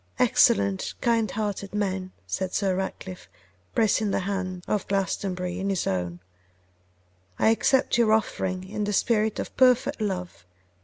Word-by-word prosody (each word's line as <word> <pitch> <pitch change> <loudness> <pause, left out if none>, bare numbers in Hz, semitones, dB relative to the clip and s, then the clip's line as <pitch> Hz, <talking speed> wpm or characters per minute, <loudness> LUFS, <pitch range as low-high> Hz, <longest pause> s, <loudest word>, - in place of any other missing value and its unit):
'Excellent, 100 -1 +3
kind 230 -3 +1
hearted 205 -1 -3
man!' 190 -2 -2
said 185 -1 -3
Sir 195 -2 +1
Ratcliffe, 190 -1 -5 0.5
pressing 220 -1 +2
the 195 - 0
hand 185 -2 -3
of 210 -3 -1
Glastonbury 185 -2 -2
in 195 +1 -2
his 195 -3 0
own; 90 -2 -2 1.2
'I - - +4
accept 240 +2 +2
your 225 -2 +4
offering 190 -4 0
in 210 +1 -3
the 205 - -2
spirit 220 +1 +1
of - - -5
perfect 255 +1 +3
love. 180 - -4
195 Hz, 140 wpm, -26 LUFS, 185-215 Hz, 1.2 s, I